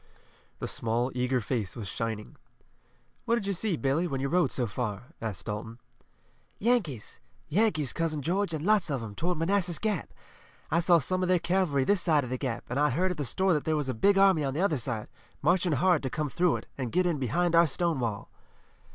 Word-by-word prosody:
The - - -4
small, 120 +3 -1
eager 125 +1 +1
face 110 -4 -3
was 110 -4 -6
shining. 110 0 -4 0.9
"What 235 -1 +2
did 225 -4 -2
you 200 - 0
see, 185 -1 -1
Billy, 140 +6 +1
when 135 -5 -3
you 135 +1 -1
rode 180 +3 +2
so 125 - -1
far?" 120 +4 -4
asked 105 -6 -5
Dalton. 110 +1 -5 0.8
"Yankees! 200 - -1 0.3
Yankees, 155 - +1
Cousin 155 -3 -1
George, 190 +4 0
and 155 0 -3
lots 205 -5 +3
of 135 -5 -2
'em, 105 -2 -7
toward 175 - -1
Manassas 175 0 +1
Gap! 210 -6 -2 0.6
I 170 - +3
saw 175 0 +5
some 185 +5 0
of 185 - 0
their 185 - +5
cavalry 170 -5 +1
this 200 +6 +2
side 155 -5 +3
of 125 - -6
the 130 - -2
Gap, 125 -5 -3
and 125 +3 -2
I 150 0 +4
heard 180 +8 +1
at 180 - -4
the 145 - -2
store 190 +7 +2
that 150 - 0
there 160 - 0
was 145 -3 -2
a - - 0
big 195 - +3
army 190 -5 +5
on 135 -1 -2
the 165 - 0
other 165 -8 +1
side, 115 -3 -3 0.4
marching 175 +2 +3
hard 175 +3 +3
to 130 - -2
come 150 +2 -2
through 175 +3 +2
it, - - -7
and 125 -3 -3
get 185 0 +2
in 170 -5 0
behind 170 +8 0
our 170 0 +6
Stonewall." 130 - -2
155 Hz, 215 wpm, -28 LUFS, 125-180 Hz, 0.9 s, our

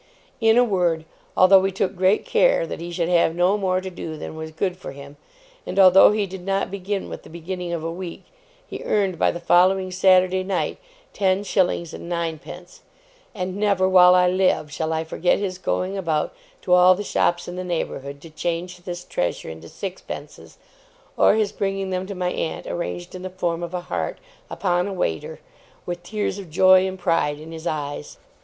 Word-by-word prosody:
In 225 0 +4
a 245 - +7
word, 175 -7 0 0.3
although 190 +1 +7
we 195 +1 0
took 190 +1 -1
great 190 +3 +2
care - - +3
that - - -6
he 170 +1 -6
should 170 -1 -1
have 170 -2 +3
no 180 +3 +3
more 185 -3 0
to 190 0 -6
do 160 -3 -6
than 155 - -7
was 160 0 -6
good 180 +3 -2
for 180 - -9
him, 140 +1 -11 0.5
and - - -6
although 190 0 +8
he 210 -1 0
did 190 -1 -9
not 195 0 -1
begin 200 0 -3
with - - -8
the - - -15
beginning 175 +1 -5
of 170 -2 -3
a 165 - -3
week, 175 0 -7 0.4
he - - -8
earned 195 -5 0
by - - +4
the 175 - -4
following 185 +2 +3
Saturday 185 0 +4
night 190 -1 -2 0.3
ten 190 0 +1
shillings 180 -4 0
and 170 - -8
nine 170 -2 -2
pence; 175 +3 -12 0.5
and 185 -2 -3
never, 200 -2 +2
while 180 -1 +7
I 180 0 +5
live, 180 -5 +1
shall 160 0 -2
I 160 0 -1
forget 165 +2 +1
his 185 -2 -3
going 190 +1 -2
about 165 - -1 0.3
to 180 - +1
all 180 +1 +7
the 205 - -4
shops 175 -3 0
in 175 - -6
the 185 - -4
neighbourhood 140 -5 -4
to 165 - -12
change 175 +3 -3
this 175 0 -7
treasure 85 - -2
into 80 +1 -10
sixpences, 190 -2 -8 0.6
or - - +5
his 215 -2 +1
bringing 195 -1 -2
them 185 0 -2
to 200 - -6
my 180 -1 -1
aunt 160 - -3
arranged 175 0 -5
in 185 - -7
the 185 - -5
form 175 -2 -2
of 175 +1 -5
a 180 - -2
heart - - -3 0.3
upon 180 -1 0
a 200 - -4
waiter, 80 - -3 0.5
with 175 0 -4
tears 205 +1 -3
of 190 -4 -9
joy 185 +3 +5
and 190 0 -5
pride 165 -5 0
in 160 +1 -10
his 165 +1 -6
eyes. 145 - -4
180 Hz, 200 wpm, -23 LUFS, 170-190 Hz, 0.6 s, although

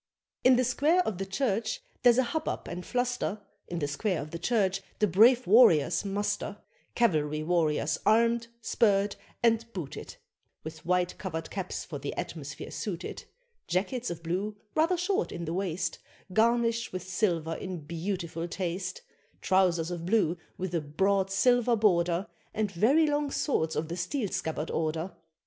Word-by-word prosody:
In 255 0 +7
the 255 - +3
square 290 +8 +3
of 215 - -3
the 195 - -3
Church 220 0 -1 0.2
there's 245 -1 +6
a 260 - +5
hubbub 310 +6 -3
and 180 +1 -5
fluster, 245 -3 -1 0.3
In 175 - -4
the 145 -3 -1
square 175 +6 -1
of 150 +1 -6
the 170 - -5
Church 195 -1 +1 0.2
the 210 - +3
brave 230 +7 +5
warriors 180 - +5
muster 205 +1 -2 0.4
Cavalry 155 -9 +1
warriors 160 -2 +1
armed, 230 +1 +3 0.2
spurred, 200 -2 +2 0.3
and 230 0 +2
booted, 165 -8 -6 0.5
With 160 -1 -8
white 180 0 +1
covered 165 -4 -5
caps 190 -2 -4
for 150 -5 -6
the 140 +1 -5
atmosphere 145 -3 -6
suited, 180 -5 -5 0.4
Jackets 240 +7 -1
of 165 -1 -6
blue, 190 +5 -2 0.2
rather 330 +4 +2
short 390 +5 0
in 170 - -5
the 165 - -3
waist, 185 -2 -2 0.3
Garnished 230 +1 +2
with 185 -1 -4
silver 175 -4 0
in 180 0 -5
beautiful 170 +1 -4
taste, 185 +1 -4 0.4
Trousers 180 -3 +2
of 170 -1 -4
blue 195 -5 +3 0.2
with 185 -1 -4
a 170 - +1
broad 190 +6 +1
silver 245 +4 +3
border 180 -4 +2 0.3
And 210 -2 0
very 250 - +4
long 295 -1 0
swords 160 - 0
of 155 - -1
the 170 +2 -5
steel 205 - -2
scabbard 160 -2 -3
order. 160 +3 -1
190 Hz, 155 wpm, -29 LUFS, 170-230 Hz, 0.5 s, In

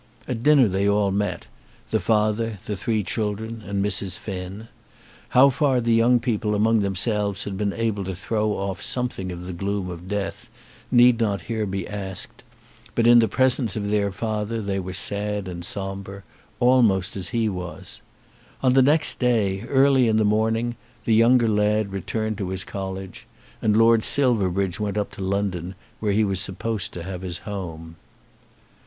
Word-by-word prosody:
At 115 -3 -3
dinner 140 -2 +5
they 100 +1 +1
all 100 -1 +2
met, 105 +1 -2 0.5
the - - +2
father, 110 0 0
the 105 - -3
three 110 +1 -1
children, 110 +3 -3
and 100 -1 -2
Mrs. 95 -2 0
Finn. 95 +2 -7 0.6
How 135 +2 +6
far 135 -1 +2
the 115 -1 +1
young 120 +2 +4
people 105 -3 -1
among 110 +2 +3
themselves 100 +1 -1
had 100 - -5
been 100 +1 -1
able 110 -2 -2
to 95 0 -4
throw 105 +2 -1
off 95 -3 -4
something 120 -6 -2
of 90 0 -7
the 90 - -6
gloom 100 +1 -3
of 85 +1 -9
death 100 0 -4 0.4
need 120 -1 +5
not 100 -5 0
here 110 +5 -3
be 95 -1 -4
asked; 95 -2 -7 0.5
but 115 - +2
in 120 0 +8
the 115 - +4
presence 130 -4 +3
of 100 -1 -2
their 100 -1 +1
father 110 +2 -3
they 100 -2 -2
were 95 0 -5
sad 105 0 0
and 85 -1 -6
sombre, 95 +1 -3 0.4
almost 115 -7 +3
as 95 -2 -3
he 115 -2 0
was. 90 -3 -6 0.6
On 130 -1 +4
the 135 - +6
next 150 +4 +3
day, 110 -6 +1
early 135 -2 +4
in 110 -1 +2
the 110 - +3
morning, 110 +3 0 0.3
the 115 - +2
younger 115 +2 +5
lad 105 -1 +1
returned 110 +3 -3
to 95 -3 -3
his 95 0 -2
college, 95 -2 -7 0.3
and 105 -1 +2
Lord 115 0 +5
Silverbridge 100 -8 +1
went 105 -1 -2
up 105 - -2
to - - -10
London, 95 -2 -2 0.2
where 105 -2 0
he 105 +2 +2
was 95 -3 0
supposed 100 +2 -2
to 85 - -6
have 95 0 -6
his 90 -2 -5
home. 85 -5 -7
105 Hz, 175 wpm, -23 LUFS, 95-115 Hz, 0.6 s, in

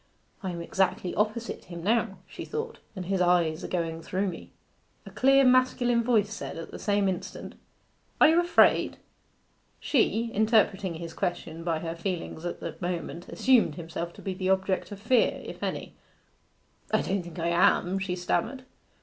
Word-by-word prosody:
'I 190 - -3
am 170 - -5
exactly 185 0 0
opposite 215 +2 -2
him 170 -2 -8
now,' 210 -1 +1
she - - -8
thought, 455 +1 -5 0.2
'and 185 -2 -5
his 190 0 0
eyes 175 -3 +2
are - - -3
going 165 -2 -2
through 190 +4 -1
me.' 170 - -9 0.6
A - - -10
clear 270 +1 +5
masculine 250 -2 +3
voice 220 -3 +2
said, - - -6
at 165 - -7
the - - -8
same 205 -1 +1
instant 185 -2 -4 0.7
'Are - - +8
you 325 +2 +5
afraid?' 350 0 +4 0.8
She, 230 -3 +1
interpreting 205 -4 +2
his 165 0 -7
question 165 -2 -3
by 165 -2 0
her 165 -1 -3
feelings 170 -1 -4
at 175 - -4
the - - -5
moment, 175 -1 -4
assumed 245 - +3
himself 170 0 -5
to - - -13
be 190 - -2
the 185 0 -2
object 190 0 0
of 200 - -7
fear, 235 +4 +2
if - - -8
any. - - -4 1.0
'I - - +3
don't 195 0 -1
think 175 0 -10
I 170 0 0
am,' 175 +2 +3
she 185 -1 -2
stammered. 205 +8 -1
190 Hz, 170 wpm, -28 LUFS, 170-225 Hz, 1.0 s, Are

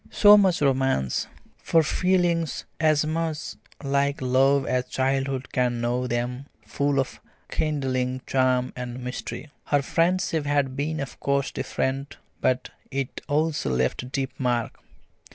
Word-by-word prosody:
So 205 0 +7
much 190 -4 +4
for 145 - +1
romance, 130 - +1 0.3
for 165 -1 +3
feelings 175 -1 +1
as 155 -1 +3
much 160 -1 -2 0.3
like 140 +1 +1
love 135 +2 +3
as 125 0 0
childhood 135 0 -1
can 125 -1 +1
know 120 +2 0
them, 125 +3 -3 0.2
full 140 -1 0
of 135 - -3 0.3
kindling 130 -4 -1
charm 130 -1 +1
and 125 0 -6
mystery. 125 +4 -6
Her 145 -1 +2
friendship 165 -2 +1
had 140 -2 +1
been 155 +3 -2
of 135 -2 -7
course 140 0 0
different, 135 +2 -3 0.2
but 130 0 0 0.2
it 135 -1 -3
also 155 - 0
left 65 - -1
deep 135 -1 -2
mark. 120 -3 -1
135 Hz, 135 wpm, -25 LUFS, 125-150 Hz, 0.3 s, So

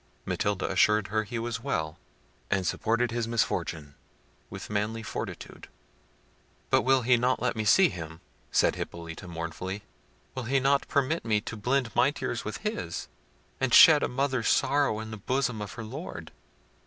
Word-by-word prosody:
Matilda 100 -1 -1
assured 105 +2 +3
her 110 +2 0
he 115 +3 -5
was 115 0 -3
well, 80 -1 -2 0.5
and 95 -1 0
supported 115 +4 0
his 115 -1 -2
misfortune 80 -10 -1 0.6
with - - -8
manly 105 +2 -2
fortitude. - - -7 1.0
"But - - +5
will 130 -1 +3
he 125 +1 +4
not 125 +2 +1
let 125 - 0
me 110 -1 -2
see 185 - +6
him?" 80 -1 -8 0.3
said - - +3
Hippolita 85 +1 -7
mournfully; 85 +4 -5 0.5
"will 130 -3 -5
he 135 +4 +2
not 140 +1 +2
permit 140 +4 0
me 110 -2 +2
to 110 - -6
blend 125 +1 -1
my - - +5
tears - - -4
with - - -4
his, - - -3 0.5
and 130 -3 +3
shed 155 -2 +9
a - - +1
mother's 130 -3 -1
sorrows 135 -6 +2
in 110 - -8
the 110 - -6
bosom 125 +1 -1
of 105 - -6
her 120 -1 -7
Lord? 110 - -7
115 Hz, 165 wpm, -28 LUFS, 100-130 Hz, 1.0 s, shed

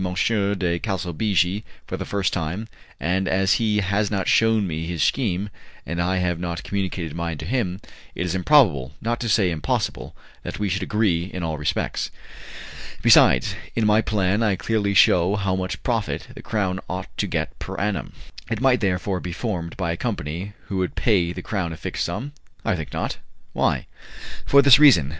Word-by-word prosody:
de 95 -1 0
Calsabigi 95 0 0 0.2
for - - -4
the - - -5
first 100 -2 0
time, 90 +5 -3 0.3
and 90 +3 0
as 95 0 +3
he 105 -2 +2
has 100 +2 0
not 100 -3 -1
shewn 115 -2 +4
me 80 -2 -3
his 85 -4 -1
scheme, 100 -5 0 0.3
and 85 +4 -2
I 90 +2 +1
have 90 -2 0
not 85 -1 -4
communicated 95 -5 -3
mine 85 -1 -3
to 75 - -7
him, 95 -4 -1 0.4
it 90 - -2
is 90 - -2
improbable, 90 - +3
not 120 +1 -2
to 115 - -2
say 100 -4 +3
impossible, 80 -3 -2 0.3
that - - -6
we 105 -1 -1
should 95 +2 -1
agree 95 -4 +1
in 90 -1 -6
all 80 -2 -2
respects. 75 - -1 0.9
Besides, - - +6 0.2
in 115 - +1
my 105 +1 +4
plan 105 -1 +1
I 105 -4 +2
clearly 100 0 0
shew 90 +1 +5
how 95 -2 0
much 95 0 -4
profit 115 -5 -2
the - - -10
Crown 95 -4 -1
ought 90 +1 -5
to - - 0
get - - -3
per - - -6
annum." 105 -1 -2 0.4
"It 115 -2 -1
might, 130 -1 +4
therefore, 95 -1 0
be 90 - -5
formed 90 -5 -4
by 90 -3 -1
a 85 - -3
company 95 -3 -4
who 100 - -4
would 95 -1 -1
pay 90 -7 +2
the - - -7
Crown 90 -6 -2
a - - -8
fixed - - -3
sum?" 145 +3 -4 0.3
"I 115 - +2
think 80 -3 -6
not." - - -3 0.4
"Why?" - - +1 0.6
"For 140 0 +6
this 140 -1 +8
reason. 105 - +7
95 Hz, 185 wpm, -23 LUFS, 85-105 Hz, 0.9 s, this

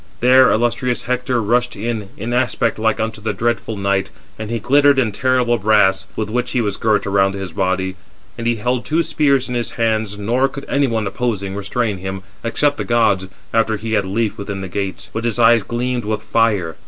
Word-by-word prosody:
There 130 +1 +6
illustrious 120 +2 0
Hector 125 0 -1
rushed 120 +3 +1
in, 110 -1 -4
in 115 +4 -4
aspect 125 -3 0
like 110 0 +1
unto 110 -1 -3
the 110 - -2
dreadful 115 -2 -2
night; 100 -1 0 0.3
and 110 -1 -5
he 115 - -1
glittered 140 +5 +4
in 120 -5 +2
terrible 125 +1 +1
brass, 105 -2 +3
with 110 - -2
which 120 +3 -2
he 125 - +1
was 105 -4 -1
girt 110 -1 +1
around 100 0 +2
his 95 -2 -5
body. 95 0 -1 0.4
And 115 - -4
he 120 - +2
held 120 +3 -1
two 160 +7 +1
spears 140 -5 +1
in 125 - -4
his 120 -1 -2
hands, 110 -3 -1
nor 120 +6 +1
could 140 +1 -8
any 140 0 +2
one, 115 -3 -1
opposing, 100 -2 -2
restrain 100 0 -2
him, 95 +1 -5 0.2
except 140 +5 +1
the - - -2
gods, 105 -6 +2 0.3
after 110 -1 +2
he 110 +2 -4
had 100 -2 +2
leaped 105 +3 -1
within 100 -1 -5
the 95 - -5
gates; 95 +1 -4
but 110 - -3
his 120 -2 0
eyes 115 -1 +5
gleamed 120 +3 -2
with 110 0 -2
fire. 105 -10 +1
110 Hz, 205 wpm, -19 LUFS, 100-120 Hz, 0.4 s, There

